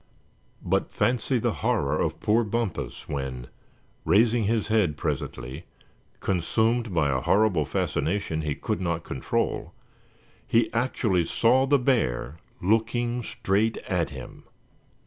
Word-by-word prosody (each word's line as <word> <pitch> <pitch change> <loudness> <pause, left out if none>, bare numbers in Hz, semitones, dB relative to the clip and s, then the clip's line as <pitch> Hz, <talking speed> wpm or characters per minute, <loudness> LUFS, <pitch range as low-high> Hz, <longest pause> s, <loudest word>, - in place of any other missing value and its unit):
But - - 0
fancy 125 +1 +1
the 115 - 0
horror - - +1
of - - -1
poor 110 +3 +3
Bumpus 115 -3 -3
when, 65 -3 -4 0.6
raising 110 +6 +3
his 110 +1 0
head 100 -9 +2
presently, 70 -1 -4 0.5
consumed 110 +5 +1
by 80 -5 +2
a 65 -1 0
horrible 95 - +3
fascination 80 +3 -1
he 75 -2 -2
could 90 - -3
not 85 -2 -1
control, 65 - -2 0.7
he 115 +1 +2
actually 115 -7 +1
saw 130 +8 +3
the 145 +1 +5
bear 110 - 0 0.3
looking 115 +4 +1
straight 110 0 0
at - - 0
him! - - -10
105 Hz, 120 wpm, -26 LUFS, 80-115 Hz, 0.7 s, the